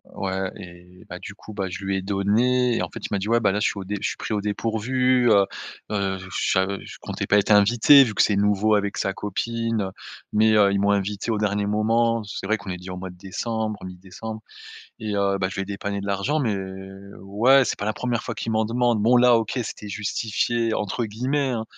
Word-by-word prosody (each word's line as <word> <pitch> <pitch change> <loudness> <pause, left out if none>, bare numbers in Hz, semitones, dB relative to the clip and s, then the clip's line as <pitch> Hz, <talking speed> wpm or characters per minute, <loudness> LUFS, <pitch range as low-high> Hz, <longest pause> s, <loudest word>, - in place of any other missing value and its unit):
ouais 95 0 -2
et 90 0 -13
bah 90 - -7
du 100 - -8
coup, 105 +1 -12
bah, 95 -2 -3
je 95 +2 -7
lui 95 0 0
ai 95 - -2
donné 115 +6 +1
et - - -1
en - - -3
fait - - -8
il - - -1
m'a 100 - 0
dit: 105 +3 -4
«Ouais 120 0 +4
bah, 105 -4 +2
là 105 - 0
je 110 - +3
suis - - -3
au - - -5
dé 105 +2 -3
je - - 0
suis - - -6
pris - - -4
au 105 - 0
dépourvu, 120 +4 +1
heu 100 -1 +5 0.5
heu, 100 -2 -1
je 95 - -10 0.2
sa 95 0 +3 0.2
je - - -10
comptais - - -4
pas 105 - +4
être 105 +1 +2
invité», 120 +7 +7
vu 110 - -3
que - - +2
c'est 105 - +3
nouveau 105 +1 +2
avec 100 -1 -1
sa 95 - -1
copine, 115 +3 -2
heu, 95 - -4 0.4
«Mais 110 +1 +4
heu, 100 -1 +5
ils 100 - +1
m'ont 100 0 +2
invité 100 +2 -1
au 110 - 0
dernier 105 -1 0
moment». 115 +2 +1
C'est 100 -1 -6
vrai 110 +1 +2
qu'on 100 - -10
est 90 - -4
déjà 90 +1 -8
au - - -7
mois 95 0 -6
de 90 - -12
décembre, 110 +3 -3
mi-décembre 95 +5 -8 0.6
et 110 -1 -4
heu, 100 -1 +1
bah, 95 -1 0
je - - -8
lui 95 - -2
ai - - -4
dépanné 100 0 -4
de 100 - -6
l'argent, 100 +10 0
mais, 110 -6 0 0.6
ouais, 115 +8 +4
c'est - - -2
pas 100 - -3
la 110 - +1
1re 120 -1 -2
fois - - -5
qu'il 115 - -3
m'en 110 0 +2
demande. 120 -1 +1
Bon 120 +3 +5
là 120 -1 +6
OK, 115 +3 -2
c'était 105 -1 -7
«justifié» 110 +2 -1
entre 105 +3 -2
guillemets, 130 +6 -1
hein. 115 -3 -2
105 Hz, 250 wpm, -24 LUFS, 100-115 Hz, 0.6 s, invité